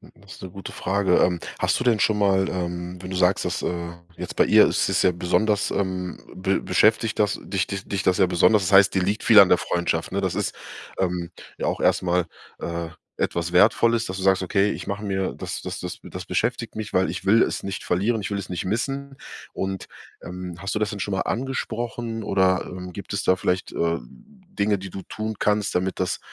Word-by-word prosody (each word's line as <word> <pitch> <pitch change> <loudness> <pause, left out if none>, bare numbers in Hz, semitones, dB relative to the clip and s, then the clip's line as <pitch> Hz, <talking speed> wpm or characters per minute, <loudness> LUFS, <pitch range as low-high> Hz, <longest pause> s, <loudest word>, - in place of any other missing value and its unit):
Das 100 -1 -14
ist - - -13
'ne 95 - -6
gute 95 +2 -8
Frage. 95 -2 +1
Ähm, 90 -1 +2 0.2
hast - - +1
du - - -1
denn 115 -4 +3
schon 110 -1 +2
mal, 95 -1 +3
ähm, 90 0 -4
wenn 90 - -7
du 95 - -4
sagst, 90 +1 +2
dass - - -2
äh, 85 -1 -3 0.2
jetzt - - -6
bei - - +4
ihr - - +6
ist - - +1
es - - +2
ja 90 - +4
besonders 100 +4 +1
ähm, 95 -2 -2 0.2
be 95 +1 0
beschäftigt 110 0 +2
das 105 -2 +1
dich 95 -1 -1
dich 95 -1 -5
dich 95 -2 -2
das 90 - +3
ja 95 - +4
besonders, 95 +4 +4
das 95 - -1
heißt, 95 0 +7
dir 95 - +2
liegt 100 +4 -1
viel 110 -2 +8
an 100 -2 +8
der 90 - +6
Freundschaft, 85 0 -1
ne? - - -1
Das - - -1
ist, - - -1 0.5
ähm, 90 -2 -1 0.3
ja - - -3
auch - - -1
erstmal, 90 -1 +2 0.3
äh, 85 -1 -4 0.3
etwas 85 0 -1
Wertvolles, 115 +5 +4
dass 95 0 -5
du 95 - -4
sagst: 95 -1 +3
„Okay, 100 +3 +2
ich - - -5
mache 100 +2 -4
mir 95 -2 -1
das - - -6
das - - -5
das - - -6
be - - -13
das 90 -1 -6
beschäftigt 115 +5 -1
mich, 110 -2 -5
weil 95 +1 +2
ich - - -5
will 110 +4 +5
es - - 0
nicht 100 -1 -4
verlieren, 105 +5 0
ich 100 - -4
will 100 - -2
es 100 - -6
nicht 90 - -3
missen.“ 135 +7 -2 0.4
Und, 95 -1 -4 0.4
ähm, 90 -1 -7
hast 95 +3 -3
du - - 0
das 105 -1 0
denn 100 - -6
schon 100 - -2
mal 95 - 0
angesprochen, 120 -2 -3
oder, 95 -2 +2
ähm, 90 -1 -8
gibt 100 - -7
es 100 - -1
da 95 - +4
vielleicht, 90 0 -1
äh, 85 0 0
Dinge, 180 - -4
die 95 -1 -8
du 95 - -6
tun 110 0 -4
kannst, 105 -1 +1
damit 95 +1 -1
das, 90 - -1
95 Hz, 230 wpm, -24 LUFS, 90-105 Hz, 0.5 s, viel